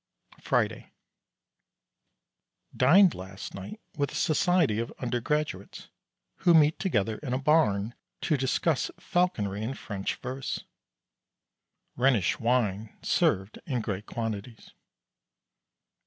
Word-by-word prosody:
Friday. - - -1 1.8
Dined 175 +9 +6
last 95 +1 -8
night 100 - -8 0.2
with 140 -1 -1
a - - -8
society 155 - +2
of 115 - -3
Undergraduates 125 -3 -3 0.5
who 175 -2 +4
meet 155 0 +5
together 110 - 0
in 135 -5 -4
a - - +2
Barn 125 -8 +2 0.3
to 155 - +1
discuss 135 +2 0
Falconry 115 - 0
and 130 +5 -4
French 100 -3 -4
verse. 130 +1 -4 1.3
Rhenish 125 -7 +2
wine 115 -3 0
served 95 +3 +1
in 125 -4 -1
great 105 -1 -4
quantities. 115 0 -5
125 Hz, 100 wpm, -28 LUFS, 105-150 Hz, 1.8 s, Dined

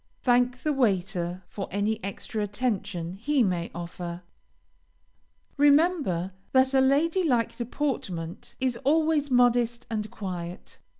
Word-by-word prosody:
Thank 245 0 +2
the 305 - +1
waiter 185 -7 0
for 195 - -5
any 210 +2 -1
extra 200 +2 -4
attention 200 -5 -2
he 275 +4 +2
may 175 -4 -1
offer. 175 0 -6 1.3
Remember 285 - +3 0.2
that 260 0 +4
a 265 - +5
lady 315 +7 +3
like 245 -8 +1
deportment 220 - -4
is 255 -2 0
always 300 +2 +2
modest 245 -1 +3
and 215 -1 -2
quiet. 180 -4 -7
235 Hz, 115 wpm, -27 LUFS, 185-270 Hz, 1.3 s, a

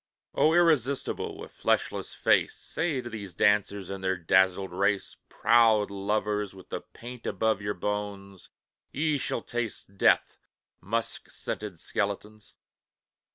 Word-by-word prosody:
O 160 +2 +4
irresistible, 145 -6 +2
with - - -9
fleshless - - 0
face, - - +2
Say 160 -4 -2
to 120 - -6
these 100 -5 -7
dancers 100 -1 +2
in 100 -1 -5
their 95 0 0
dazzled 95 +2 +3
race: 100 +2 0
"Proud 110 -3 +4
lovers 105 0 -1
with 95 - -14
the - - -4
paint 120 0 -10
above 110 -2 +1
your 105 0 -2
bones, 100 -1 -4 0.4
Ye 150 0 +1
shall 120 - -2
taste 115 -4 -5
death, - - +3 0.4
musk 115 +5 -2
scented 100 -6 -5
skeletons! 105 +2 -4
105 Hz, 125 wpm, -28 LUFS, 100-115 Hz, 0.4 s, O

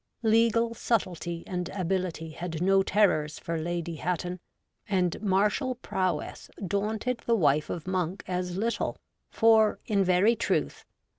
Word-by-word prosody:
Legal 230 +1 +3
subtlety 175 -8 -2
and 180 -1 -3
ability 180 -4 -2
had 165 0 -5
no 195 +2 +4
terrors 185 -7 +2
for 165 -1 -3
Lady 170 0 -3
Hatton, 180 +2 -2 0.5
and 180 -3 0
martial 210 +6 +1
prowess 185 -6 -3 0.2
daunted 215 +5 -1
the 235 - +4
wife 150 -6 +2
of 165 - -4
Monk 185 0 -2
as 180 0 -2
little, 230 +3 -1 0.3
for, 220 -2 +4
in 200 -2 +2
very 185 +5 +4
truth. 225 - -1
185 Hz, 130 wpm, -28 LUFS, 175-215 Hz, 0.5 s, no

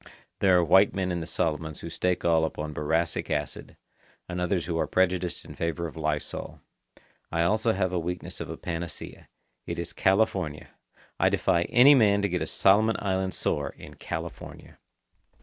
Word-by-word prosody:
There 95 -2 +5
are 90 - +4
white 95 +5 +5
men 95 -1 -1
in 85 - -1
the 80 - -6
Solomons 80 -2 -2
who 85 - -6
stake 90 +2 -1
all 80 -1 +4
upon 75 -1 -3
boracic 80 +3 -1
acid, 75 -2 -4 0.5
and 90 0 -4
others 90 -1 0
who 85 - -3
are - - 0
prejudiced 90 -1 0
in - - -10
favour 85 +1 -2
of 80 - -7
lysol. 75 -2 -3 0.7
I 85 0 +1
also 110 +5 +2
have 95 -2 0
the 90 - 0
weakness 90 +2 -5
of - - -6
a - - -6
panacea. 85 -1 -6 0.4
It - - -4
is 85 0 -5
California. 95 -6 +1 0.5
I - - +4
defy 85 0 +1
any 130 +5 +7
man 100 -6 +4
to 100 - +1
get 90 -1 -1
a 80 - -2
Solomon 110 +3 +3
Island 95 -1 -1
sore 70 -1 -2
in - - -11
California. 80 +1 -8
85 Hz, 175 wpm, -27 LUFS, 80-95 Hz, 0.7 s, any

